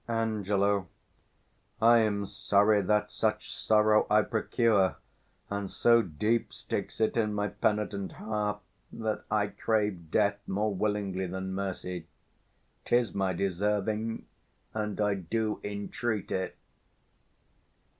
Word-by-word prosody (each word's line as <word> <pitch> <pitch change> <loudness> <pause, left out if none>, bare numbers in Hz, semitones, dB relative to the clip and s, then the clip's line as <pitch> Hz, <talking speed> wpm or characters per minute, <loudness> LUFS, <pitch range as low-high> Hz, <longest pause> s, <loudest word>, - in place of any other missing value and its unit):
Ang. 115 -2 -1 1.4
I 115 +1 +6
am 105 -2 +1
sorry 105 0 +3
that 105 +2 +1
such - - -1
sorrow 105 0 +3
I 105 0 +5
procure: 110 -4 +2 0.5
And 100 -1 -3
so 115 0 +4
deep 105 +6 0
sticks - - -5
it 110 - +2
in 105 -3 +1
my 105 0 0
penitent 105 0 -1
heart, 105 -1 -2 0.3
That 110 -1 -3
I 105 -1 +2
crave 105 -4 -1
death 100 +2 +2
more 105 +2 0
willingly 100 -2 -1
than 95 +1 -4
mercy; 90 -3 -4 0.8
'Tis 120 -1 +2
my 95 -1 0
deserving, 105 +4 -1 0.5
and 105 -1 -3
I 105 -1 +2
do 105 +4 -2
entreat 105 +1 -3
it. 95 0 -2
105 Hz, 115 wpm, -29 LUFS, 100-110 Hz, 1.4 s, I